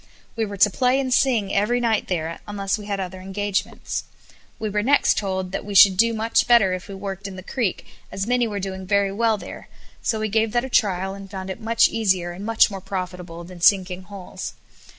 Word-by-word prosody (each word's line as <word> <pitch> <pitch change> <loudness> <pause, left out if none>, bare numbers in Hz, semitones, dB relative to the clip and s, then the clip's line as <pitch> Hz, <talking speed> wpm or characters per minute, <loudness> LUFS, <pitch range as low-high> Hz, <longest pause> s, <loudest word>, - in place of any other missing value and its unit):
We 225 -1 0
were 200 0 -7
to 205 +2 +6
play 255 +5 +2
and 260 -2 0
sing 230 -7 +2
every 215 +5 +2
night 230 -3 +1
there, 165 -2 -3
unless 200 -1 -1
we 210 -1 -8
had 200 -1 -2
other 185 0 -5
engagements. 195 +1 -3 0.5
We 220 - -3
were 210 0 0
next 275 +6 +3
told 190 -2 -2
that 195 - -3
we 205 0 -6
should 195 -1 +8
do 230 +5 +4
much 225 +1 +1
better 230 -6 +5
if 185 +1 -5
we 200 - -7
worked 195 0 -6
in 195 - -8
the 185 - -9
creek, 215 -2 -2 0.3
as 195 - -3
many 245 0 +1
were 205 -2 -4
doing 190 -1 -5
very 200 0 +2
well 220 +1 +1
there, - - -10 0.3
so 220 - 0
we 215 - -1
gave 220 +1 +1
that 240 +1 +1
a - - -7
trial, 195 -5 +1
and 195 0 -10
found 190 -1 -6
it 205 - -8
much 230 +1 +4
easier, 190 -6 0
and 180 +3 -8
much 225 0 +3
more 195 -1 -6
profitable 180 -3 -6
than 175 0 -12
sinking 185 -1 +3
holes. 195 -2 -8
200 Hz, 220 wpm, -23 LUFS, 190-220 Hz, 0.5 s, should